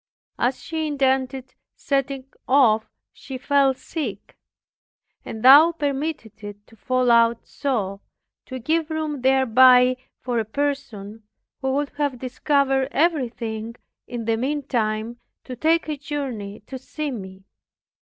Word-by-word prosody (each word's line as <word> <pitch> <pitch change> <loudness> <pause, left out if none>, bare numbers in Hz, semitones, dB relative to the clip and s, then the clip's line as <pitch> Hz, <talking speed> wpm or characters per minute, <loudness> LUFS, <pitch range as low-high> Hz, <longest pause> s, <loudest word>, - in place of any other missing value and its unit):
As 250 +2 0
she 320 -1 -3
intended 265 -2 -1 0.2
setting 275 -1 -2 0.2
off, 230 -5 +4 0.2
she 265 - -8
fell 275 0 +2
sick. 255 - -6 0.9
And 220 0 -7
Thou 295 +6 +8
permitted 285 -7 -4
it 205 0 -9
to 225 - -20
fall 255 +2 +1
out 230 0 +3
so, 205 -9 -3 0.5
to 260 - -6
give 315 +6 -1
room 310 -3 -3
thereby 255 -1 +5 0.2
for 245 -2 -2
a - - 0
person, 225 -4 -4 0.4
who 265 0 0
would 285 +1 -1
have 285 -3 -1
discovered 270 +1 0
everything, 235 -8 -1 0.3
in 240 -2 -5
the 225 0 +1
meantime 235 -4 -2 0.2
to 255 - -7
take 320 +6 +1
a 305 -1 -3
journey 260 -9 -5
to 260 +5 -9
see 300 +3 -5
me. 190 -5 -8
260 Hz, 125 wpm, -23 LUFS, 230-285 Hz, 0.9 s, Thou